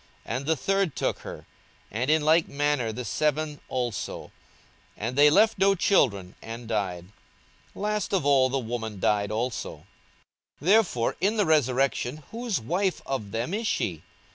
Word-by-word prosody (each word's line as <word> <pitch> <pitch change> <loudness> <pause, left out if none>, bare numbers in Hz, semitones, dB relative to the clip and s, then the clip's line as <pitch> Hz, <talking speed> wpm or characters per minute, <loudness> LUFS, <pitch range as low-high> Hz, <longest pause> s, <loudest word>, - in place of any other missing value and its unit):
42:020:031 - - -3
And 135 - -6
the 160 - +3
third 195 0 0
took - - -1
her; - - -9 0.5
and 120 +6 -1
in 155 0 +4
like 160 +2 +4
manner 145 -5 0
the 125 +2 -6
seven 150 +6 -1
also: 120 -5 -3 0.7
and 115 +4 -3
they 145 +2 +7
left 210 +6 +4
no 195 +1 +4
children, 100 - +2
and 115 +1 -8
died. 95 -6 -2 0.7
42:020:032 - - -9
Last 210 -1 -1
of 175 -7 0
all 135 -2 +4
the 135 - 0
woman 110 -4 -4
died 100 +1 +1
also. 115 +3 -2
42:020:033 - - -16 0.8
Therefore 180 - +3
in 205 +4 +2
the 205 - +3
resurrection 135 -1 +1
whose 230 -3 -2
wife 180 - -1
of 130 -7 -3
them 115 - -3
is 220 +2 -1
she? 85 - -1
140 Hz, 165 wpm, -26 LUFS, 115-175 Hz, 0.8 s, they